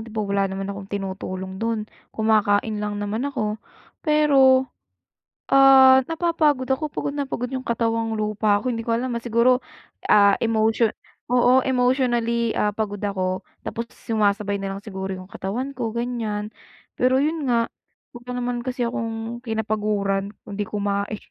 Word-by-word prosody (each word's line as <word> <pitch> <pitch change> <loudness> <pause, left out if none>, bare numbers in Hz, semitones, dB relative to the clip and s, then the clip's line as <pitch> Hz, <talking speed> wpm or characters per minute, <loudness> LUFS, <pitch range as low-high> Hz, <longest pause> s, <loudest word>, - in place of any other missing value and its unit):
'di 220 - -11
ba 215 -1 -1
wala 200 -1 0
naman 195 0 -4
akong 195 -1 -9
tinutulong 190 -1 -5
do'n, 225 -2 -1 0.3
kumakain 215 -1 +2
lang 210 0 -3
naman 210 +6 -2
ako. 215 -6 -3 0.4
Pero, 275 -4 +4 0.9
ah, 265 -1 +7
napapagod 320 -5 +1
ako, 280 +4 0
pagod 285 - -3
na 285 - -1
pagod 250 -2 -4
yung 260 0 -5
katawang 230 -1 0
lupa 210 -1 +1
ko. 255 - -2
Hindi 230 -2 -3
ko 230 - 0
alam, 245 +3 -1
ah, 230 - -8
siguro, 240 +2 +3 0.5
ah, 200 -1 +5
emotion 225 0 +1 0.3
oo, 250 +1 +4
emotionally, 245 -3 +1
ah, 210 - +1
pagod 205 -1 -4
ako 185 -2 -1 0.2
tapos 230 0 -4
sumasabay 205 -2 -1
na 195 0 -4
lang - - -10
siguro 190 -2 -5
yung 185 - -9
katawan 225 +9 -4
ko, 240 -4 -3
ganiyan. 220 -3 -3 0.4
Pero 255 +1 +2
'yon 300 0 0
nga, 235 -1 +3 0.5
wala 240 +1 -12
naman 245 -1 -2
kasi 250 0 -2
akong 230 0 -4
kinapaguran 210 -3 -1 0.2
kung - - -8
'di 205 0 -3
kumain. 200 0 -2
225 Hz, 150 wpm, -23 LUFS, 205-250 Hz, 0.9 s, ah